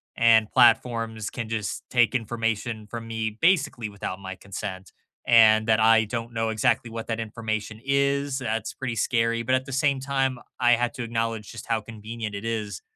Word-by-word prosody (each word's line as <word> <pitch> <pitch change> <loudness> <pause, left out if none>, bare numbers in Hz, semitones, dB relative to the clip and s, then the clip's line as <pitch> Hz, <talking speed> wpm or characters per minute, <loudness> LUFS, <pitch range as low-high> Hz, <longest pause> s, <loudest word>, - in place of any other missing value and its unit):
and 110 -2 +5
platforms 115 -3 +3
can 115 -3 -6
just 110 -3 -3
take 120 -1 +3
information 115 -1 -2
from 115 +1 -7
me, 110 -1 -3
basically 145 - +2
without 100 -2 -6
my 95 -1 -7
consent, 95 -1 -7 0.4
and 110 -2 +6
that 110 -2 +4
I 110 0 +5
don't 115 +1 -5
know 115 -1 -1
exactly 110 +2 +1
what 115 0 -6
that 115 -1 -2
information 110 -1 -4
is, 140 0 +1
that's 110 -3 -3
pretty 125 -3 -4
scary. 115 0 +1
But 130 +2 +2
at 130 0 -1
the 135 - -8
same 140 0 +2
time, 135 -2 -1 0.2
I 120 -1 +4
had 120 0 0
to 125 - -4
acknowledge 115 -2 -3
just 115 - -9
how 115 -1 0
convenient 110 0 -7
it 100 +2 -6
is 105 -5 -3
115 Hz, 180 wpm, -25 LUFS, 110-120 Hz, 0.4 s, and